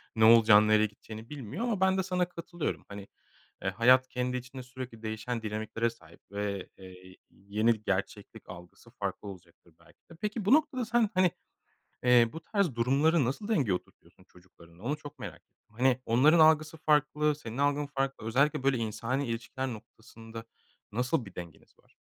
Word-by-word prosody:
ne 110 0 +4
olacağını, 110 -2 +7
nereye 110 0 +4
gideceğini 110 +2 -10
bilmiyor 140 - -6
ama 225 -6 -1
ben 190 0 +3
de 190 - +1
sana 180 -1 -1
katılıyorum. 175 -1 -5
Hani, 100 0 -9 0.5
eee, 95 - -1
hayat 125 +6 +4
kendi 125 0 -2
içinde 130 +1 -8
sürekli 125 -2 -9
değişen 110 +2 -4
dinamiklere 110 +2 -2
sahip 85 -8 -17
ve, 100 -1 -3
eee, 95 - -13 0.2
y 95 0 -14
yeni 105 +3 -1
gerçeklik 100 +2 -4
algısı 90 -1 -13
farklı - - -5
olacaktır 85 -3 -13
belki 85 - -25
de. - - -11
Peki 210 -1 -3
bu 210 - +5
noktada 275 -5 +2
sen, 230 -1 +2
hani, 185 -2 +3 0.7
eee, 120 -2 +5
bu 160 - -6
tarz 190 - -1
durumları 140 +6 +3
nasıl 140 - -3
dengeye 145 - +1
oturtuyorsun 90 +1 -9
çocuklarınla 90 -1 -19
onu 145 +5 -1
çok 145 -1 -12
merak - - -7
ettim. - - -55
Hani, 130 0 +2
onların 145 +9 +5
algısı 155 0 +4
farklı, 150 0 +2
senin 120 -5 -8
algın 145 +1 +1
farklı 135 -4 -3
özellikle, 135 +4 +2
böyle, 135 -1 +2
insani 115 +4 -2
ilişkiler 115 +3 -4
noktasında 115 0 -10 0.5
nasıl 125 +4 -1
bir 95 - -13
dengeniz 85 -3 -11
var? - - -29
125 Hz, 170 wpm, -29 LUFS, 110-150 Hz, 0.7 s, olacağını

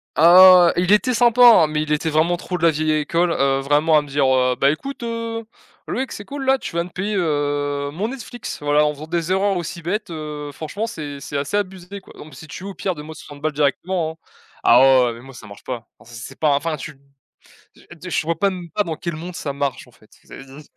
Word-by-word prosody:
Ah, 180 +1 +8
ouais, 175 - +1
ouais, - - +1
il - - +4
était 245 +4 +3
sympa 240 +1 +3
hein, 225 -10 +8
mais 150 0 -1
il 150 - -6
était 160 +2 -1
vraiment 160 +3 +2
trop 180 +1 -5
de 170 - -8
la 165 - +6
vieille 155 +1 -1
école, 170 +3 0
heu, 135 -2 +1
vraiment 150 +3 +3
à - - +3
me 145 - -12
dire, 140 0 +1
heu: 130 -1 +2
«Beh 140 +2 +4
écoute, 275 - -8
heu, 230 -1 -4 0.4
Loïc, 260 +1 -3
c'est 205 - -8
cool 280 -1 -6
là, 265 0 +3
tu 175 - -8
vas 170 - +1
me 180 - -10
payer, 200 +4 -3
heu, 145 -4 -1
mon 205 +7 -3
Netflix 245 -2 -8
voilà 145 +1 +2
en 150 - 0
faisant 150 +2 -10
des 170 +1 -2
erreurs 195 +1 +1
aussi 170 0 -5
bêtes, 200 +4 -3
heu, 150 -2 -6
franchement 180 +10 -5
c'est 145 -11 -7
c'est 145 - -5
assez 145 +8 -3
abusé 190 -1 -4
quoi, - - -17
donc 150 -3 -12
si 155 - -11
tu 185 - -8
veux 200 - -5
au - - -10
pire 185 +1 -3
donne 150 -1 -10
moi 160 0 -9
60 145 -1 -12
balles 155 -1 -1
directement 160 +3 -1
hein». - - -38 0.4
Ah 120 +2 +6
ouais, 135 -1 +6
ouais 120 - -2
mais 115 - -12
moi 135 0 -13
ça 110 -3 -12
marche 100 - -13
pas, 120 -2 -6
enfin 120 - -18
c'est 115 - -9
c'est 135 +3 -10
pas 155 - +2
un 140 - +3
enfin 160 +1 -2
tu 150 +3 -8
m 140 - -21 0.8
je - - -20
de 180 +2 -10
ch - - 0
je - - -10
vois 165 -1 -1
p 200 +3 +2
même 180 -3 -8
pas 210 - 0
dans 160 -3 -4
quel 170 0 -5
monde 170 +2 -8
ça 140 -2 -4
marche 140 -2 -3
en - - -20
fait 110 -1 -24
c'est - - -12
du 135 +3 -13
160 Hz, 275 wpm, -20 LUFS, 145-185 Hz, 0.8 s, Ah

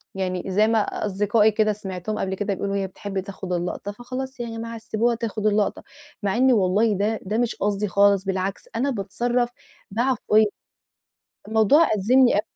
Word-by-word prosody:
يعني 185 -2 -2
زي 210 +3 +3
ما 225 -1 +3 0.3
أصدقائي 210 +2 +3
كده 215 0 +2
سمعتهم 195 0 -5
قبل 190 0 -2
كده 205 0 -2
بيقولوا 200 +1 -3
هي 195 -1 -1
بتحب 195 +1 -5
تاخد 190 -1 -6
اللقطة، 180 +3 -3
فخلاص 255 +4 -6
يعني 230 -1 -5
ما 230 0 -5
تسيبوها 225 +2 0
تاخد 220 -2 -4
اللقطة، 210 -1 +1 0.4
مع 195 0 0
إني 260 0 +5
والله 205 +2 +3
ده 210 +3 0
ده 210 +4 -2
مش 240 -1 0
قصدي 205 +1 -1
خالص 200 0 +3
بالعكس 190 +1 -3
أنا 255 +5 +1
باتصرف 240 +2 -1 0.4
بعفوية، 230 -2 +2 1.0
الموضوع 220 +9 +4
أزّمني 240 +3 +4
أ - - +3
210 Hz, 165 wpm, -23 LUFS, 195-230 Hz, 1.0 s, إني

